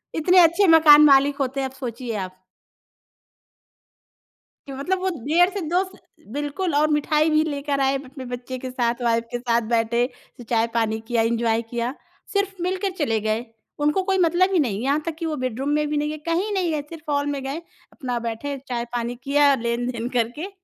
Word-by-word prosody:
इतने 360 +3 +4
अच्छे 345 +4 +5
मकान 310 -2 +8
मालिक 280 0 +5
होते 270 0 -2
हैं, 265 - -1
अब - - -19
सोचिए 240 -2 -5
आप। 185 -1 -6 2.3
कि 275 - -7
मतलब 360 +8 -2
वो 380 - 0 0.2
डेढ़ 350 +4 +4
से 400 - -3
2 360 +2 +2
स 375 - -13 0.4
बिल्कुल, 295 +4 -2
और 305 +1 +3
मिठाई 300 +1 +2
भी 310 0 +3
लेकर 285 -2 -2
आए 270 0 +2
अपने 260 0 -9
बच्चे 245 +1 -6
के 255 - -6
साथ, 240 -1 -1
वाइफ़ 230 0 +2
के 245 - -2
साथ 235 -1 +1
बैठे, 235 +2 +1 0.3
स - - -8
चाय-पानी 225 -1 0
किया, 235 -2 +1
एन्जॉय 230 0 +1
किया। 240 +2 -2 0.4
सिर्फ़ 395 -2 -1
मिलकर 375 +1 -1
चले 225 -7 +1
गए। 220 +3 -1 0.4
उनको 300 +6 +2
कोई 385 0 +1
मतलब 360 +2 +3
ही 355 - +3
नहीं, 220 -8 0
यहाँ 285 +3 +1
तक 330 -2 -3
कि 330 - -3
वो 310 -1 -2
बेडरूम 255 +3 -2
में 300 0 +1
भी 300 - -1
नहीं 295 +1 0
गए, 310 - -4
कहीं 355 +6 0
नहीं 360 -4 0
गए, 300 -2 -1
सिर्फ़ 320 -2 -7
हॉल 285 0 +1
में 285 -1 -2
गए, 280 +5 -4 0.3
अपना 250 -5 -3
बैठे, 275 +5 -4
चाय-पानी 240 0 -3
किया, 285 0 +4
लेन-देन 235 0 -2
करके 245 - -2
280 Hz, 190 wpm, -23 LUFS, 240-320 Hz, 2.3 s, मकान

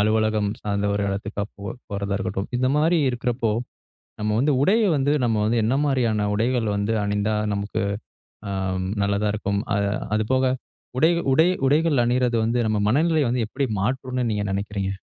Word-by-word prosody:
அலுவலகம் 110 -1 +2
சார்ந்த 100 -1 -1
ஒரு 100 - 0
இடத்துக்கா 100 +1 -3
போ 100 - -12 0.3
போறதா 100 0 -2
இருக்கட்டும். 95 0 -3
இந்த 130 +1 +1
மாரி 165 +3 +3
இருக்கிறப்போ! 120 -1 -1 0.7
நம்ம 105 0 0
வந்து 145 +5 +3
உடைய 220 +7 +4
வந்து 140 +1 +1
நம்ம 115 -2 +1
வந்து 115 +2 +1
என்ன 120 - +1
மாதிரியான 115 -7 +1
உடைகள் 115 +1 +1
வந்து 100 +2 0
அணிந்தா 105 +1 0 0.2
நமக்கு 100 0 -2 0.7
அம் 95 -1 -2 0.2
நல்லதா 100 +1 +1
இருக்கும். 100 -1 -1 0.2
அ - - +2 0.4
அதுபோக 130 +5 +1 0.5
உடை 160 +5 +5 0.2
உடை 160 +6 +5 0.2
உடைகள் 150 -3 +3
அணியிறது 125 0 +1
வந்து 120 +2 +1
நம்ம 110 - +1
மனநிலைய 155 +3 +2
வந்து 120 -1 0
எப்பிடி 135 +4 -2
மாற்றும்ன்னு 125 +2 -1
நீங்க 105 -1 -1
நினைக்கிறீங்க? 100 0 -2
110 Hz, 155 wpm, -23 LUFS, 100-130 Hz, 0.7 s, உடை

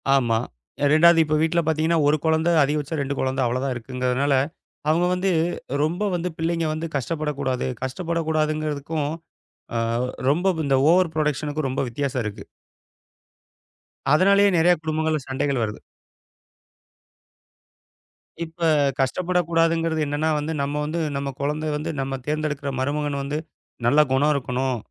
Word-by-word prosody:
ஆமா. 120 -4 +2 0.5
2வது 170 +2 +6
இப்ப 155 0 0
வீட்ல 165 +1 +2
பாத்தீங்கன்னா 160 +1 +2
1 150 +1 +4
குழந்தை, 160 +2 +2
அதிகபட்சம் 150 +2 -1
2 140 +1 -2
குழந்தை 130 0 0
அவ்வளவுதான் 130 +2 -1
இருக்குங்கறதுனால, 125 +3 -1 0.6
அவங்க 170 +3 +3
வந்து 185 +1 0 0.5
ரொம்ப 175 +7 -1
வந்து 175 +1 -2
பிள்ளைங்க 165 0 0
வந்து 160 +2 -3
கஷ்டப்படக் 150 +1 -2
கூடாது. 130 -1 -1 0.2
கஷ்டப்படக் 165 +4 -2
கூடாதுங்கறதுக்கும், 155 -1 -1 0.7
அ - - +1 0.5
ரொம்ப 180 +5 +2
இந்த 135 -1 +3
ஓவர் 180 -1 +3
ப்ரோடக்ஷனுக்கும் 150 -1 -1
ரொம்ப 130 - -1
வித்தியாசம் 130 0 -2
இருக்கு. 105 -1 -6 1.7
அதனாலயே 200 +4 +5
நெறைய 175 +2 +5
குடும்பங்கள்ல 155 -1 0
சண்டைகள் 135 -1 -1
வருது. 105 -1 -4 2.7
இப்ப 165 +2 -17 0.4
கஷ்டப்படக் 175 +6 0
கூடாதுங்கறது 165 -1 +2
என்னன்னா 145 +2 -1
வந்து, 155 +2 -3
நம்ம 140 +1 -2
வந்து 160 +3 -2 0.2
நம்ம 140 0 -3
குழந்த 150 +2 -1
வந்து 155 +2 -4
நம்ம 135 0 -3
தேர்ந்தெடுக்கிற 150 -2 -2
மருமகன் 145 +1 -1
வந்து, 145 +2 -3 0.5
நல்ல 140 +5 +4
குணம் 145 +3 +3
இருக்கணும், 130 -1 -1
150 Hz, 125 wpm, -23 LUFS, 140-165 Hz, 2.7 s, 2வது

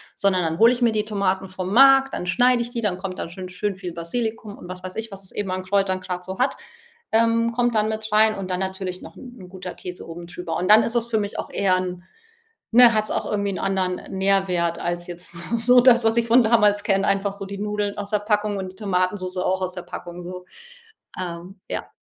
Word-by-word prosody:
sondern 190 -2 +2
dann 160 0 -1
hole 230 +2 +6
ich 250 0 -2
mir 235 -2 +4
die 215 -1 -1
Tomaten 195 -2 -1
vom 185 0 -5
Markt, 270 +2 +6
dann 180 - -4
schneide 245 +6 +3
ich 235 - -8
die, 235 -2 -3
dann 190 -4 -1
kommt 185 -1 -6
da - - -4
schon 185 +1 -8
schön 195 +2 -3
viel 180 -3 -7
Basilikum 215 +5 -4
und 175 - -11
was 185 0 -8
weiß 185 0 -7
ich, 225 -1 -5
was 195 0 -10
es 185 - -14
eben 200 -3 -3
an 185 0 -3
Kräutern 195 -1 +1
grad 180 -1 -5
so 190 0 -7
hat, 255 +2 +1 0.6
ähm, 230 +1 +3
kommt 240 -1 0
dann 215 0 +2
mit 220 0 -3
rein 215 0 +4
und 190 -1 -6
dann 180 0 -1
natürlich 190 -1 -4
noch - - -11
'n 245 -8 -12
guter 185 -1 -7
Käse 180 -1 -7
oben 170 +1 -8
drüber. 175 -2 -5
Und 185 +2 -2
dann 220 +1 +8
ist 235 - -2
es 235 -1 +2
für 220 -2 0
mich 205 0 -4
auch - - -4
eher 190 -2 +2
'n 180 -1 -4 0.7
ne, 240 -1 +7
hat 215 - +3
es - - -6
auch - - -2
irgendwie 200 -2 -1
anderen 190 -2 -1
Nährwert 190 -3 +1
als 175 0 -3
jetzt 175 +1 -4
so 170 +7 -3
so 245 +2 +6
das, 240 -2 +5
was 225 +1 +2
ich 235 0 +1
von 235 +1 +6
damals 210 -2 +3
kenne, 195 -1 +2
einfach 195 0 +1
so 200 0 -7
die 200 0 -7
Nudeln 210 0 -2
aus 205 0 -5
der 210 -1 +1
Packung 210 -1 0
und 185 -1 -5
die 190 - -16
Tomatensoße 185 -2 -1
auch 190 0 0
aus 185 0 -2
der 180 -1 -7
Packung. 175 0 -8
So, 180 +1 -8 0.8
ähm, 180 +2 -7
ja. - - -4
195 Hz, 240 wpm, -23 LUFS, 185-220 Hz, 0.8 s, dann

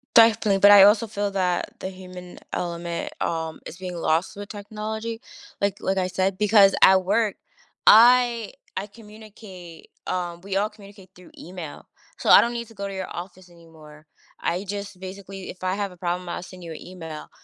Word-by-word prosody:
Definitely, 225 -3 +5
but 205 +1 +8
I 200 -1 +10
also 210 +3 +5
feel 205 -1 -3
that 180 -2 -1
the 190 - -5
human 180 -1 -11
element, 170 -1 -4
um, 160 -1 -3
is 165 - -9
being 180 -1 -6
lost 165 +4 0
with 205 0 -8
technology, 220 +2 -6 0.4
like 200 -1 0
like 190 0 -1
I 185 -1 +1
said, 185 +1 -1
because 205 -1 +5
at 190 -1 +6
work 215 +1 +1 0.5
I 235 0 +6 0.2
I 195 - -3
communicate, 210 -5 -13 0.2
um 175 -2 -3
we 195 +1 -3
all 205 +2 +1
communicate 200 -3 -16
through 180 0 -16
email, 175 -3 -9 0.3
so - - -2
I - - +10
don't 235 - 0
need 235 -1 -5
to 225 - -16
go 200 -1 -5
to - - -7
your 190 -1 -4
office 180 +1 -9
anymore. 160 -3 -16 0.4
I 180 +4 -2
just 200 -1 -6
basically, 190 0 -9
if 185 - -10
I 185 0 0
have 200 -2 -3
a - - -18
problem, 175 +1 -3
I'll 175 - -5
send 185 0 -12
you 165 - -7
a - - -8
email. 165 -4 -9
190 Hz, 185 wpm, -24 LUFS, 180-205 Hz, 0.5 s, I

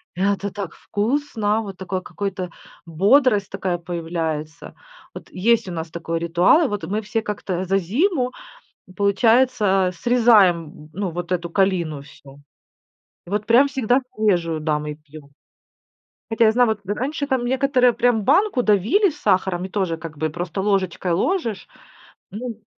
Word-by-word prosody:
Это 200 +1 -1
так 200 -5 -6
вкусно, 220 -2 -1
вот 195 -4 -8
такой 185 0 -4
какой-то 190 -2 -5 0.4
бодрость 205 - +3
такая 180 -2 -2
появляется. 165 -2 -5 0.4
Вот - - -11
есть 225 +2 +1
у - - -5
нас 165 -1 -5
такой 165 0 -3
ритуал, 175 - +3
вот 205 -3 -4
мы 210 +3 -2
все 220 +2 -2
как-то 195 -4 -4
за 195 +2 +1
зиму 255 - 0 0.7
получается 205 -1 +3
срезаем, 190 -10 +3
ну, 195 -2 -2
вот 175 +1 -6
эту 170 -1 -2
калину 170 -6 0
всю. 140 0 -16 0.9
Вот 210 +3 -3
прям 245 +6 +5
всегда 260 -1 +1 0.2
свежую, 175 -7 +1
да, 150 -1 0
мы 150 0 -5
пьём. 150 -1 -15 1.0
Хотя 225 0 +3
я 220 - +5
знаю, 245 -1 +3
вот, 220 -1 -1
раньше 275 +8 -3
там 260 -3 0
некоторые 260 -1 +3
прям 235 -2 +1
банку 305 - +2
давили 220 - +3
с 300 -2 -11
сахаром 185 -1 +1
и 190 - -7
тоже 185 -5 -2
как 160 -2 -9
бы 155 +1 -1
просто 175 +4 -4
ложечкой 190 -3 0
ложишь, 230 - -1 0.6
ну. 225 +1 -7
200 Hz, 145 wpm, -21 LUFS, 170-235 Hz, 1.0 s, прям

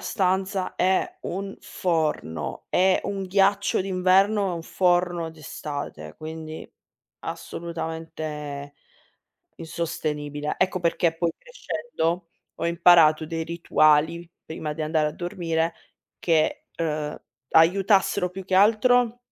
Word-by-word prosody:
stanza. 190 -1 -1
È 190 - +1
un 195 +2 -5
forno. 160 - -2
È 185 +1 +3
un 195 -1 -3
ghiaccio 200 +1 +2
d'inverno 195 +2 +3
e 175 - -2
un 165 - -5
forno 175 -2 +1
d'estate, 145 - -7
quindi 155 0 -7 0.5
assolutamente 155 -4 -6 0.8
insostenibile. 150 -3 -3
Ecco 185 0 +1
perché 170 -1 +1
poi 170 -1 0
crescendo, 180 - -3 0.3
ho - - -3
imparato 165 -2 +5
dei 165 0 -3
rituali 165 0 +2
prima 155 -1 -5
di 155 +1 -4
andare 155 -1 +1
a - - -6
dormire 165 -1 -2 0.5
che, 160 -2 +1
uhm, 155 -2 -2 0.3
aiutassero 190 +2 +4
più 190 +1 -8
che 185 0 -1
altro 230 +4 +4
170 Hz, 105 wpm, -25 LUFS, 155-190 Hz, 0.8 s, imparato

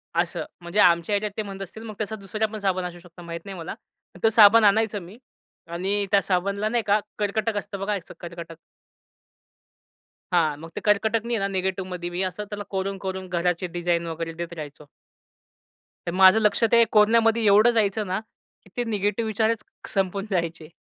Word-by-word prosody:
असं, 170 -1 -1 0.2
म्हणजे 175 +4 -2
आमच्या 170 +1 +4
ह्याच्यात 210 +1 -1
ते - - 0
म्हणत 195 -1 -8
असतील, 205 +4 -8
मग 215 -2 -8
तसा 215 +1 -3
दुसरा 215 +1 -2
पण 215 0 -7
साबण 185 -2 0
असू 175 0 -7
शकतो, 175 0 -15
माहीत 170 0 -6
नाही 195 -2 -7
मला. 165 0 -6 0.5
तो 225 - +6
साबण 225 0 +7
आणायचं 215 +1 +3
मी 180 +6 -12 0.5
आणि 195 +4 -1
त्या 200 -1 +5
साबणला 200 +3 0
नाही 235 -1 0
का, 205 +1 +4 0.2
कर्कटक 210 +1 -1
असतं 200 -1 -5
बघा, 200 +2 -1
असं 195 -4 -6
एक - - -28
कर्कटक. 170 -1 -8 1.8
हां, 155 -4 +2
मग 165 +1 -9
ते - - -4
कर्कटकनी 220 +3 +1
आहे - - -1
ना 195 - 0
निगेटिव्हमध्ये 185 -2 -3
मी 175 +1 -3
असं 185 +2 -3
त्याला 210 -1 -5
कोरून-कोरून 190 -1 -3
घराची 180 0 -1
डिझाइन 175 -1 0
वगैरे 165 0 -4
देत 170 +1 -6
राहायचो. 150 -2 -9 1.2
तर 175 - -1
माझं 190 +3 +8
लक्ष 215 +2 +2
ते 235 0 +7
कोरन्यामध्ये 225 +1 +4
एवढं 210 +4 +6
जायचं 215 -2 +1
ना, 185 +2 -1 0.4
की 195 - -20
ते 245 - +1
निगेटिव्ह 210 +1 0
विचारच 220 0 0 0.3
संपून 195 0 0
जायचे. 170 -3 -2
195 Hz, 180 wpm, -24 LUFS, 175-215 Hz, 1.8 s, माझं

